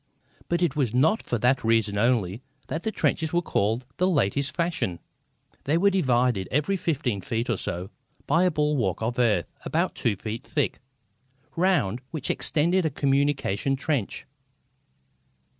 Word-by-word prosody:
But 175 +1 +1
it 160 -4 +1
was 125 -6 0
not 160 - +3
for 120 - -2
that 125 +4 +2
reason 110 -2 +2
only 110 -2 +1 0.3
that 160 - -2
these 220 - -3
trenches 160 -1 0
were 175 - +2
called 115 -1 0
the 185 +1 +2
latest 140 - +1
fashion. 165 - -1 0.7
They 150 +4 +2
were 200 +3 +4
divided, 125 - +2
every 150 +8 +1
fifteen 140 - -1
feet 115 +5 -2
or - - +1
so, 90 +3 -4 0.3
by 170 +5 +3
a - - +4
bulwark 150 - 0
of 120 +2 -2
earth 105 -8 +1
about - - 0
two 110 - 0
feet 110 +4 -5
thick, 150 -3 -1 0.8
round 145 - +1
which 155 -5 -2
extended 175 +5 +2
a 160 - +1
communication 135 -3 +1
trench. 140 -5 -2
135 Hz, 150 wpm, -26 LUFS, 115-160 Hz, 0.8 s, were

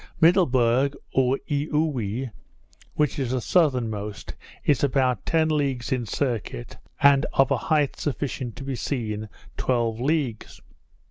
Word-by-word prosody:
Middleburg, 140 -6 +4 0.2
or 130 0 +3
Eaoowee, 140 -6 -1 0.6
which 150 -1 +1
is 130 -3 -1
the 130 +1 0
southernmost, 115 - 0 0.3
is 145 -3 +2
about 130 -5 +1
ten 160 -1 +3
leagues 140 -6 -1
in 125 -3 -1
circuit, 110 - -3 0.3
and 140 0 +6
of 135 -1 +3
a - - +3
height 150 -3 +2
sufficient 130 -4 -3
to 130 - -8
be 135 -1 -3
seen 110 -3 -3 0.3
twelve 115 -3 0
leagues. 135 -5 -1
130 Hz, 125 wpm, -25 LUFS, 120-145 Hz, 0.6 s, and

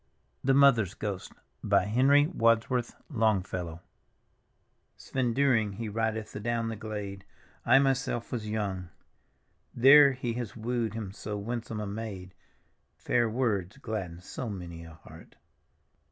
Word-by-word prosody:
THE 135 0 +3
MOTHER'S 135 -9 +5
GHOST: 100 -3 -5 0.4
henry 130 +8 +4
wadsworth 115 -4 +1 0.2
LONGELLOW 95 - -1 1.2
Svend 125 -3 -2
Dyring 115 -7 +2
he 110 0 -5
ridcth 110 0 -2
adown 115 +2 -1
the 110 - -4
glade; 105 -3 -6 0.3
/ - - -34
myself 135 -2 +2
was 110 -4 -3
young. 100 -4 -3 0.9
There 140 +3 +8
he 125 -2 -3
has 120 -3 -5
wooed 115 -1 -2
him 105 -4 -5
so 105 +1 -5
winsome 115 +1 -4
a 105 - -3
maid; 100 -3 -6 0.6
Fair 120 -2 +1
words 110 -4 -1
gladden 100 -9 -5
so 115 +5 -6
many 85 -4 -7
a 80 -1 -12
heart. - - -15
110 Hz, 125 wpm, -29 LUFS, 100-120 Hz, 1.2 s, There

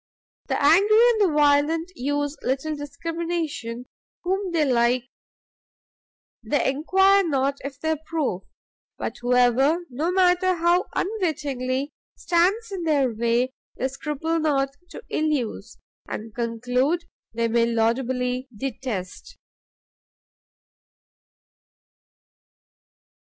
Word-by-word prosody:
The - - 0
Angry 390 +9 +5
and 440 -2 0
the 370 -6 +3
Violent 300 +4 +3
use 290 +3 -1
little 275 +4 -1
discrimination; 290 -4 -4 0.4
whom 380 +1 -1
they 320 -3 +2
like, 245 -1 +2 1.4
they 290 -2 +1
enquire 385 +7 +4
not 275 -4 0
if 275 0 -7
they 320 +1 -1
approve; 315 - -2 0.6
but - - -4
whoever, 250 +7 +3
no 305 +8 -1
matter 365 0 +3
how 345 +2 +2
unwittingly, 285 - -2 0.2
stands 385 +6 +1
in 385 -2 -4
their 285 -7 +1
way, 235 +3 0 0.2
they 260 - 0
scruple 300 +4 -2
not 280 -3 +1 0.2
to - - -10
ill 310 - +1
use, 275 -7 -3 0.3
and 220 0 -6
conclude 245 +8 0 0.3
they 230 0 +1
may 230 0 +2
laudably 250 +2 0
detest. 225 -7 -5
285 Hz, 100 wpm, -24 LUFS, 250-335 Hz, 1.4 s, Angry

